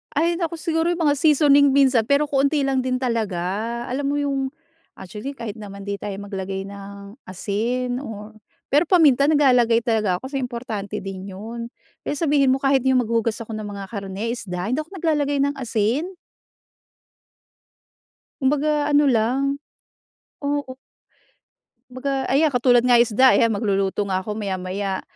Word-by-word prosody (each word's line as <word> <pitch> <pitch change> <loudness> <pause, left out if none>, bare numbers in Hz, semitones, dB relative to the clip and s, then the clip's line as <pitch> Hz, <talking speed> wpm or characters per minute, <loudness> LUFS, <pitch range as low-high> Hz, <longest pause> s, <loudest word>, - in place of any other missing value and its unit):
Ay, 330 +4 +2
naku 335 0 -2
siguro 325 +1 0
'yong 350 - 0
mga 290 - +4
seasoning 285 -1 +5
minsan. 265 -3 +4
Pero 280 +1 +3
kaunti 280 0 +1
lang 270 -1 +1
din 255 0 -1
talaga. 225 -1 -2
Alam 275 +3 -3
mo 285 - 0
'yong 275 -2 -1 0.5
actually, 215 +9 -7
kahit 225 -3 -5
naman 200 -2 -9
'di 200 0 -4
tayo 200 -2 -5
maglagay 195 -1 -5
ng 200 0 -10 0.2
asin 245 +7 -2
or 215 -4 -8 0.4
pero 295 +5 +3
paminta, 300 -7 +5
naglalagay 250 -6 +4
talaga 215 -6 +1
ako, 260 - -7
kasi 275 - -3
importante 235 -5 -5
din 195 0 -7
'yon. 230 +4 -7 0.4
Eh, - - -1
sabihin 285 -4 +2
mo - - +1
kahit 270 -1 +3
'yong 260 -1 +4
maghugas 230 0 0
ako 225 0 -7
ng 215 - -6
mga 200 -1 -6
karne, 200 +1 -5
isda, 180 -6 -5
hindi 255 - 0
ako 320 +6 -13
naglalagay 295 -4 0
ng 285 0 0
asin. 245 - -1 2.3
Kumbaga, 295 +2 +1
ano 290 0 +4
lang. 270 +3 +1 0.8
Oo. 285 -2 -2 1.1
Kumbaga 265 +1 -3
ayan 290 +3 +3
katulad 245 -1 +4
nga 245 -1 +5
isda, 245 +3 +5
ayan, 230 - +4
magluluto 200 -2 0
nga 190 -1 -1
ako 210 +2 -5
maya-maya. 190 -1 -3
245 Hz, 150 wpm, -22 LUFS, 205-280 Hz, 2.3 s, seasoning